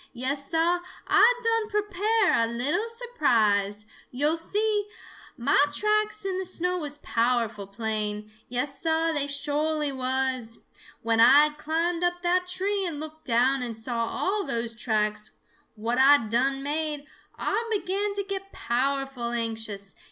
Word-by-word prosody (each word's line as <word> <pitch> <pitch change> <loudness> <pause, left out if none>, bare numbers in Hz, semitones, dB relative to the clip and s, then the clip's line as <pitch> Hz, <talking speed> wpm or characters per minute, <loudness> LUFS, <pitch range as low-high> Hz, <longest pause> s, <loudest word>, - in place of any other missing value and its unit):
Yes, 275 +3 -1
Sah, 335 +2 +2 0.3
Ah 480 - +6
done 455 -1 +1
prepare 415 0 +1
a 230 - +3
little 290 - -1
surprise. 220 - +1 0.2
Yo' 290 +5 +1
see, 415 +5 -1 0.5
mah 280 +3 +3
tracks 425 +4 0
in 375 -1 -1
the 380 - -3
snow 360 0 -2
was 295 -2 -5
powerful 230 -6 0
plain. 210 0 -3 0.2
Yes, 255 +3 -2
Sah, 325 0 +1
they 285 -2 0
sho'ly 295 +1 -1
was! 255 -3 -2 0.4
When 230 0 +2
Ah 280 +6 +7
had 300 - -16
climbed 335 +3 -1
up 350 0 0
that 360 +1 +1
tree 390 +2 -1
and 330 -5 -3
looked 315 +1 -9
down 255 +2 +2
and 235 -3 -4
saw 230 0 -2
all 405 - -1
those 235 -6 -3
tracks 215 -2 -1 0.5
what 230 +3 -1
Ah 275 -2 +6
done 270 +5 +1
made, 295 0 -2 0.3
Ah 430 +4 -1
began 400 0 -1
to 400 - -1
get 390 0 -6
powerful 270 0 -1
anxious. 220 -4 -4
285 Hz, 145 wpm, -26 LUFS, 235-360 Hz, 0.5 s, Ah